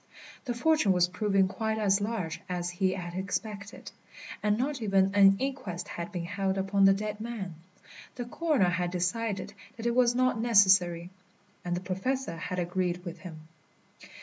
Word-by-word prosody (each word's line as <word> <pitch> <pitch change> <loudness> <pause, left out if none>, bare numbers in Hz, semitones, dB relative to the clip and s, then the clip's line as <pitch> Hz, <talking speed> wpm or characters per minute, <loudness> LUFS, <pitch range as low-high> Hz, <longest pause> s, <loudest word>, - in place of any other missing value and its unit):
The 245 -2 -2
fortune 300 -6 +3
was 180 -1 +3
proving 195 +1 +1
quite 220 +2 -2
as 200 -2 +2
large 205 -6 -3
as 175 -1 -2
he 185 +1 0
had 175 -2 -6
expected, 200 +2 -5 0.5
and 210 0 +2
not 270 +1 -2
even 195 -2 +2
an 195 -1 +7
inquest 255 -10 -4
had 170 +4 -6
been 175 -3 -4
held 195 +1 -1
upon 195 +1 +2
the 195 - +7
dead 210 +1 -4
man. 220 -6 -5 0.6
The 245 - -4
coroner 275 - +1
had 175 0 -1
decided 190 +3 -2 0.2
that 230 - -7
it 235 - +2
was 245 -1 +3
not 255 -2 +2
necessary, 190 -6 +4 0.5
and 175 0 -2
the 175 - -3
Professor 190 +4 -2
had 180 +2 -5
agreed 180 0 -1
with 175 - -7
him. 160 -4 -10
195 Hz, 165 wpm, -29 LUFS, 180-225 Hz, 0.6 s, an